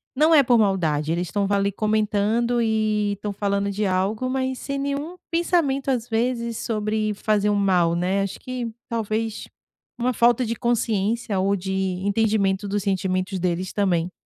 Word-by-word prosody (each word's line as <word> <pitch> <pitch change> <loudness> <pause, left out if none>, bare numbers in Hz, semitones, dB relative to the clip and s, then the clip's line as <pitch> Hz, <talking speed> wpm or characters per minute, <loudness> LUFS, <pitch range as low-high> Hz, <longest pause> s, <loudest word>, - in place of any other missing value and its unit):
não 310 +4 +5
é 285 - +7
por 245 -1 +4
maldade, 160 -7 +1
eles 175 +1 -1
estão 200 +3 -1
ali, 200 0 +1
comentando 215 +3 +1
e 215 -2 +1
estão 205 +1 -5
falando 200 0 -1
de 210 +2 -2
algo, 200 +7 0
mas 260 -1 -2
sem 275 0 -4
nenhum 280 +5 -3 0.2
pensamento, 330 -6 +1
às 245 -3 0
vezes, 235 0 -1
sobre 215 -1 -1
fazer 210 0 +1
um 205 - +2
mal, 180 -4 +2
né, 185 +3 0
acho 195 - -4
que 250 -3 -5 0.2
talvez 225 -1 -2 0.5
uma 250 +1 0
falta 240 +2 +3
de 230 +1 -2
consciência 225 -2 0
ou 195 +2 +2
de 190 0 -4 0.3
entendimento 205 -2 +1
dos 200 0 -1
sentimentos 190 -1 -1
deles 180 +1 -2
também. 180 -4 +1
210 Hz, 160 wpm, -23 LUFS, 195-235 Hz, 0.5 s, é